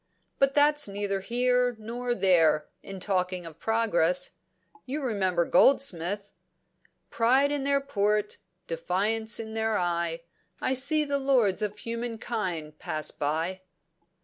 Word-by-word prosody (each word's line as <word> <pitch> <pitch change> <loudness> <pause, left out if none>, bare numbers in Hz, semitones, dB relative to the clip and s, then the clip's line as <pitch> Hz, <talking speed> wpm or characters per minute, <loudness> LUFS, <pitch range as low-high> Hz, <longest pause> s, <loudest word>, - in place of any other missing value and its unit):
But 275 0 +3
that's 295 -1 +4
neither 200 0 -2
here 245 +4 +1
nor 240 +3 -3
there, 165 -7 +3
in 195 -1 -8
talking 185 -2 -1
of 165 -1 -11
progress. 180 -6 +1 0.6
You 280 +4 -3
remember 190 -8 0
Goldsmith 200 -4 +2 0.8
'Pride 260 +5 +3
in 285 -2 -2
their 280 0 +2
port, 210 -5 0 0.3
defiance 205 +8 -1
in 220 -1 -6
their 220 -1 0
eye, 170 -1 -1 0.4
I 260 - 0
see 285 +4 +2
the 280 -1 -1
lords 245 -8 +2
of 210 0 -3
human 230 +1 -4
kind 180 -10 -4
pass 155 0 -3
by.' 165 +6 -2
210 Hz, 125 wpm, -27 LUFS, 180-245 Hz, 0.8 s, that's